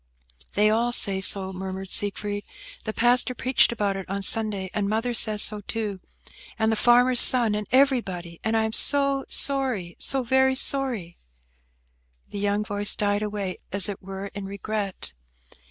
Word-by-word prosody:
"They 210 +1 +3
all 235 +2 0
say 195 -5 0
so," 190 0 -1
murmured 190 0 -7
Siegfried. 205 0 -2 0.4
"The 220 - -3
pastor 245 +2 +2
preached 255 +1 +3
about 205 -4 -2
it 195 -1 -8
on 200 0 -3
Sunday, 205 -4 +1
and 205 -2 -2
mother 225 +3 -1
says 215 -2 +2
so, 210 -1 -2
too, 210 -2 -5 0.6
and 220 -1 +1
the - - +1
farmer's 245 +2 +4
son, 235 -4 +5
and 210 -1 -4
everybody; 210 -11 0
and 220 +1 0
I 220 - +1
am 220 0 -3
so 275 +1 +4
sorry, 255 -11 +1
so 270 -1 0
very 265 +2 +2
sorry!" 255 -11 +1 1.1
The 205 - -6
young 205 +1 -1
voice 205 0 0
died 205 0 -1
away, 205 -3 -4
as 195 -1 -1
it 200 -2 -7
were, 195 +1 -8
in 200 -1 -7
regret. 200 - -4
210 Hz, 160 wpm, -24 LUFS, 195-240 Hz, 1.1 s, son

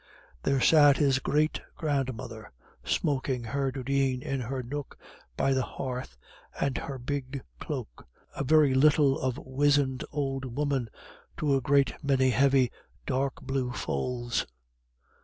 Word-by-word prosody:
There 135 - +1
sat 145 -1 +6
his 135 -3 +3
great 150 +3 +1
grandmother 130 -7 -3 0.3
smoking 130 -4 0
her 135 +3 -1
dudeen 135 0 0
in 135 0 -2
her 130 +2 -3
nook 145 +3 -6 0.4
by 135 - +2
the 130 - +2
hearth, 125 - -5 0.4
and 140 -1 0
her 140 - -4
big 135 +1 -4 0.2
cloak - - -6 0.3
a - - -2
very 150 -1 +5
little 145 0 +4
of 130 0 -1
wizened 140 -1 +1
old 135 -4 -3
woman 140 -5 0 0.5
to 145 -3 +2
a 135 - +1
great 140 +2 +3
many 130 -2 +3
heavy, 135 0 +3 0.3
dark 135 0 -1
blue 130 -2 -2
folds. 120 - -2
135 Hz, 130 wpm, -28 LUFS, 130-140 Hz, 0.5 s, sat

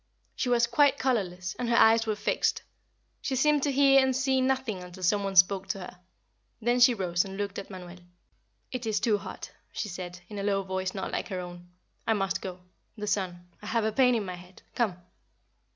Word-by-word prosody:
She 250 - -1
was 240 -1 +4
quite 285 +4 +3
colorless, 185 -8 -1
and 245 -1 -1
her 235 - +3
eyes 225 0 +5
were 215 - 0
fixed. 205 - 0 0.6
She 265 - -2
seemed 295 +2 +3
to 285 - +1
hear 275 0 +6
and 265 -1 +1
see 265 0 +2
nothing 260 -7 0
until 180 +1 -10
some 200 +3 +2
one 195 -1 -3
spoke 190 +1 +5
to 195 - -2
her. 180 -1 -9 0.6
Then 240 +2 +1
she 245 0 +6
rose 180 -3 0
and 195 0 -8
looked 200 -1 -3
at 200 - -9
Manuel. 180 -2 -10 0.7
"It 250 -2 -4
is 215 -1 +1
too 215 -4 +2
hot," - - -8 0.2
she 210 - -4
said, 180 -1 -7
in 210 0 -7
a - - -3
low 200 -1 +1
voice 190 0 -3
not 190 - -4
like - - -2
her 185 -2 -4
own. 175 0 -9 0.4
"I 225 - +4
must 195 -2 -1
go. 185 -1 -7 0.4
The 210 - -4
sun. 180 -4 -2
I 210 - -9
have 225 0 0
a 220 - +1
pain 250 +2 +4
in 215 -3 -1
my 185 - -5
head. 180 +1 -13
Come." 215 -7 0
205 Hz, 215 wpm, -28 LUFS, 185-240 Hz, 0.7 s, hear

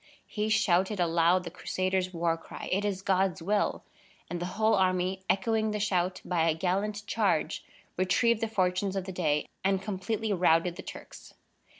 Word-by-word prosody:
He 215 0 -2
shouted 195 -2 +2
aloud 170 +1 +3
the 170 - -7
Crusaders' 185 +1 -1
war 170 -1 0
cry: 165 - -9
"It 195 +2 +1
is 195 -2 -2
God's 190 -1 +1
will!" 205 +5 0 0.5
and 175 - -2
the 175 - -3
whole 220 0 +3
army, 185 -1 +1
echoing 220 +3 +1
the 210 0 -2
shout, 185 -3 0
by 165 -2 +1
a 155 - +1
gallant 200 +5 -1
charge 205 -9 0 0.3
retrieved 215 +5 +2
the 225 - +1
fortunes 190 -1 0
of 195 - -1
the 190 - -5
day 155 -5 0 0.2
and 195 0 +2
completely 210 +2 -2
routed 175 -1 +3
the 190 - -7
Turks. - - -11
190 Hz, 170 wpm, -29 LUFS, 180-205 Hz, 0.5 s, aloud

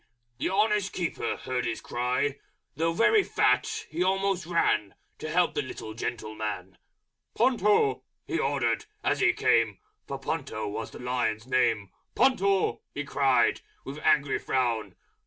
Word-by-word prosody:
The - - 0
Honest 205 0 +1
Keeper 175 -3 -2
heard 125 -2 -2
his 115 -1 -2
cry, 125 +4 -1 0.4
Though 165 +1 +1
very 235 - +4
fat - - +1
he 160 +3 -4
almost 190 -1 +1
ran 105 - +1 0.2
To 155 - -5
help 175 +3 +2
the - - 0
little 125 -4 -7
gentleman. 110 -4 -5 0.6
"Ponto!" 205 - +3 0.2
he 165 - -2
ordered 135 -6 0 0.2
as - - +1
he - - +5
came - - +2 0.3
(For - - -4
Ponto 110 -1 -3
was 105 +2 -4
the - - -11
Lion's 125 -3 -1
name), 115 -6 +1 0.2
"Ponto!" 195 -7 +2
he 145 - -2
cried, 135 -2 +2 0.2
with 140 +2 -6
angry 145 -2 +2
Frown. 120 -4 -1
135 Hz, 140 wpm, -28 LUFS, 115-180 Hz, 0.6 s, he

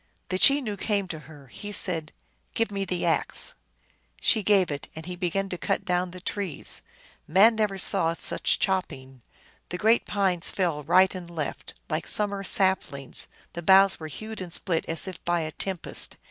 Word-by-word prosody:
The 185 - -1
Chenoo 260 -6 +5
came 200 -1 -1
to 160 - -5
her. 145 -3 -13
He 205 +10 -8
said, 170 -6 +1 0.2
" - - -43
Give 230 -2 0
me 195 -1 -2
the 180 -2 -2
axe! 165 -2 0 0.3
" - - -39 0.3
She 220 - +3
gave 195 -5 +3
it, 145 - -5
and 160 0 -8
he 180 0 -5
began 185 +2 -1
to 180 - -5
cut - - -1
down 180 0 0
the 185 +1 -10
trees. 190 -3 0 0.5
Man 195 +8 +6
never 210 -3 0
saw 165 -2 +1
such - - 0
chopping! 135 -9 -2 0.5
The 180 - -4
great 220 +5 +3
pines 190 -4 +1
fell 170 -6 -1
right 185 +5 +4
and 180 -2 -8
left, 160 -4 -5
like 155 0 -2
summer 200 -1 0
saplings; 185 -9 0 0.3
the 170 - -5
boughs 190 +2 +5
were 160 - -6
hewed 215 +7 -7
and 180 -2 -7
split 170 -1 -1
as 165 +3 -1
if 185 -3 -8
by 175 -1 0
a 155 0 -4
tempest. 185 +3 -2
185 Hz, 185 wpm, -26 LUFS, 165-195 Hz, 0.5 s, Man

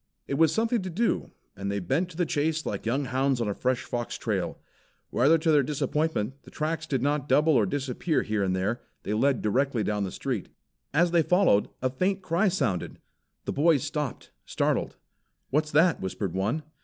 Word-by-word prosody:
It - - -3
was 160 +3 +4
something 225 0 +1
to 185 - -4
do 220 +7 0 0.3
and 100 +1 -3
they 100 - -1
bent 140 - 0
to 165 - -12
the 175 - +2
chase 155 +1 0
like 100 +2 -3
young 135 +5 0
hounds 130 +1 +1
on 115 - 0
a 100 - 0
fresh 130 +4 -1
fox 120 -1 -4
trail. - - -2 0.5
Rather 145 +7 +4
to 160 0 +1
their 150 -2 +5
disappointment, 140 -3 -1
the - - -15
tracks 160 +1 -3
did 135 -5 -1
not 145 0 0
double 155 +2 +4
or 115 -7 +3
disappear 140 - -1
here 110 -1 -1
and 95 -1 +1
there. 100 +6 -1 0.2
They 105 - -2
led 135 +4 +2
directly 125 +2 +1
down 105 -1 -1
the 95 - -3
street. - - -3 0.4
As 165 +4 +3
they 170 -1 +4
followed, 180 - +3
a 130 - +1
faint 190 +7 0
cry 185 +4 +2
sounded. 135 - -1 0.5
The - - -2
boys 150 -1 +3
stopped, 150 -3 -4
startled. - - -1 0.6
"What's 150 +2 +1
that?" 160 +3 +3
whispered 95 0 -3
one. 105 +11 -1
140 Hz, 195 wpm, -27 LUFS, 115-160 Hz, 0.6 s, their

